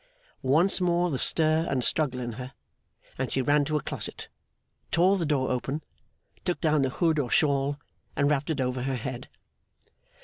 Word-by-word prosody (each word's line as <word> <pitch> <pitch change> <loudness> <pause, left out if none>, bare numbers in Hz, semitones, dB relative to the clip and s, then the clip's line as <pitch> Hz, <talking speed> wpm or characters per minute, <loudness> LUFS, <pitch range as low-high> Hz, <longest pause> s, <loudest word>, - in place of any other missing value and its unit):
Once 160 +9 +3
more 175 -1 +2
the 135 - -2
stir 160 +1 +3
and 130 -2 0
struggle 135 -1 +1
in 120 -1 -4
her, 125 +3 -8 0.7
and 130 - -2
she - - 0
ran 145 +3 +3
to 150 +2 0
a 150 - -4
closet, - - -5 0.6
tore 180 +4 +4
the 170 -5 -1
door 135 -4 +1
open, 135 +4 -2 0.6
took 175 - -1
down 155 -3 +2
a 135 - +1
hood 160 +3 +1
or 130 -4 -1
shawl, 140 0 +2 0.4
and 140 - +2
wrapped 145 0 0
it 155 -3 -1
over 125 -1 -1
her 135 +1 -1
head. 125 +1 -6
145 Hz, 175 wpm, -27 LUFS, 130-160 Hz, 0.7 s, tore